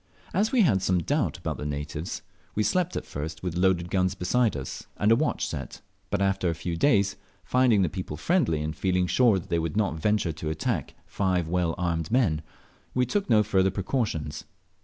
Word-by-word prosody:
As 205 +5 +2
we 255 - +4
had 100 - +3
some 90 -2 +1
doubt 140 - 0
about - - -4
the - - -6
natives, 75 +3 -4 0.3
we 110 - +2
slept 180 - +1
at - - -3
first 80 +3 -6
with 90 -2 -3
loaded 90 -1 +2
guns 95 -1 +1
beside 110 - +1
us 65 -1 -6
and 105 +2 +3
a - - +7
watch - - 0
set; - - -6 0.3
but 100 -1 +1
after 95 -2 +1
a 85 - -1
few 85 +1 -3
days, 100 -2 +3 0.3
finding 125 -6 +3
the - - +2
people 75 -1 -5
friendly, 80 - +1
and 75 0 -3
feeling 90 +3 +1
sure 115 +2 +4
that 90 - -7
they 85 - +1
would 80 +3 -2
not 100 -5 +2
venture 105 -1 +1
to 80 0 -5
attack 80 0 -2
five 90 -4 0
well 85 -1 0
armed 85 -3 -1
men, 110 -11 +2 0.5
we 125 0 +3
took 200 - -1
no 110 -2 +5
further 95 -2 +2
precautions. 95 - -2
95 Hz, 200 wpm, -27 LUFS, 80-110 Hz, 0.5 s, a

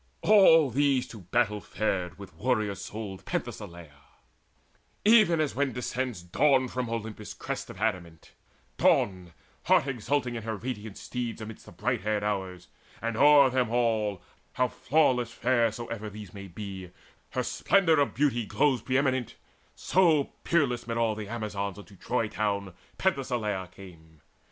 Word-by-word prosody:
All 165 -9 +6
these 135 0 +2
to 110 - -10
battle 105 +3 0
fared 95 -4 -2
with 100 -3 -11
warrior 110 +3 0
souled 100 0 -7
Penthesileia: 80 -5 -6 1.0
even 210 -7 +6
as 155 -2 0
when 140 -1 0
descends 125 -4 -3
Dawn 130 +9 +3
from 125 -2 -3
Olympus' 110 -2 -5
crest - - -5
of - - -10
adamant, 90 -7 -3 0.5
Dawn, 90 -3 +2 0.3
heart - - +4
exultant 130 0 -1
in - - -5
her 110 0 -3
radiant 110 -3 -6
steeds 120 -2 -4
Amidst 110 0 -9
the - - -11
bright 115 +7 -1
haired 105 -1 -1
Hours; 95 -3 -3 0.3
and 115 0 -3
o'er 140 +1 +6
them 125 -3 +1
all, 110 -5 0 0.3
How 125 0 +1
flawless 130 -6 +1
fair 120 -2 +2
soever 110 -1 -6
these 105 -2 -10
may 100 -1 -8
be, 95 0 -7 0.4
Her - - 0
splendour 170 -6 +3
of 140 - +1
beauty 120 -5 +1
glows 130 -1 +2
pre 130 +2 0
eminent; 130 -4 0 0.4
So 165 -6 +2
peerless 135 -8 +1
amid 115 0 -3
all 115 -2 +2
the 105 -1 -6
Amazons 105 -4 -4
Unto 105 0 -13
Troy 115 +3 -1
town 100 -3 -2 0.2
Penthesileia 120 - -1
came. 80 -5 -15
115 Hz, 145 wpm, -28 LUFS, 100-130 Hz, 1.0 s, All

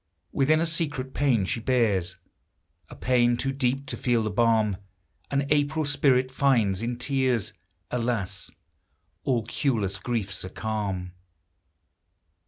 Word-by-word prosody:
Within, 155 +3 +3
a 165 - +2
secret 150 -5 -2
pain 125 -9 +2
she 115 - -1
bears, 110 -7 +1 0.4
— - - -43
A - - -10
pain 120 -1 +2
too 135 - -1
deep 135 0 -1
to 135 - -5
feel 120 -3 +1
the 110 - -2
balm 110 -2 +2 0.5
An 140 0 0
April 150 +1 +2
spirit 135 -3 +2
finds 115 -8 +2
in 120 +1 -2
tears; 130 -3 0 0.4
Alas! 115 -6 -2 0.8
all 120 -5 +1
cureless 110 -7 -1
griefs 100 -4 -3
are 95 - -6
calm 100 -4 -3
120 Hz, 130 wpm, -26 LUFS, 105-135 Hz, 0.8 s, Within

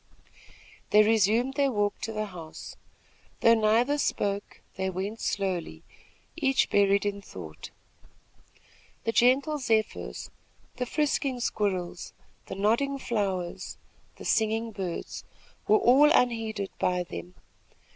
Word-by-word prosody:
They 210 0 +6
resumed 225 +4 +3
their 275 -1 +2
walk 205 -2 -1
to 225 - -3
the 215 -1 -2
house. 170 -5 -9 0.7
Though 230 - +7
neither 230 +6 +3
spoke, 200 -6 -2
they 190 0 -1
went 195 +4 -4
slowly, 180 - -2 0.5
each 270 -4 +1
buried 200 0 +3
in 200 0 -2
thought. - - -10 1.3
The 225 - 0
gentle 270 +6 +3
zephyrs, 215 - -1 0.5
the 250 0 -2
frisking 280 -2 0
squirrels, 190 -7 -2 0.3
the - - -5
nodding 235 +8 +1
flowers, 195 -8 -3 0.4
the - - -11
singing 225 +1 +1
birds, 190 -5 -5 0.4
were 215 - +6
all 275 +7 +6
unheeded 225 -7 +1
by 180 0 +1
them. 180 +1 -8
215 Hz, 115 wpm, -28 LUFS, 195-245 Hz, 1.3 s, Though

